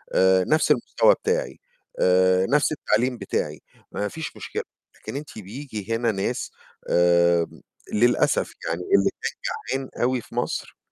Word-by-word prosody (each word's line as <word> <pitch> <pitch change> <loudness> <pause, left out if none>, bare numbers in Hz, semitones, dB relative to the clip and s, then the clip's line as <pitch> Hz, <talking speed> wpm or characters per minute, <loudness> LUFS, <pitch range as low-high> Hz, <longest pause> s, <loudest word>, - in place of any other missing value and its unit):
آآ 95 0 +5
نَفْس 155 - +2
المستوى - - +4
بتاعي، 480 +3 -2 0.4
آآ 95 0 +4
نَفْس 150 +5 +2
التعليم 130 -4 0
بتاعي، 75 -7 -3 0.3
ما 105 - -2
فيش 160 +8 -6
مشكلة، - - -4 0.3
لكن - - -8
أنتِ 145 -5 -7
بييجي 110 0 -5
هنا 115 -1 +1
ناس 95 -1 -2 0.4
آمم، 85 -1 +3 0.3
للأسف 120 +3 +2 0.2
يعني 85 - -2
اللي 100 +2 +3
كان - - -1 0.4
جعان 135 -1 -4
أوي 125 0 +1
في - - -15
مصر، - - -3
110 Hz, 135 wpm, -24 LUFS, 95-135 Hz, 0.4 s, آآ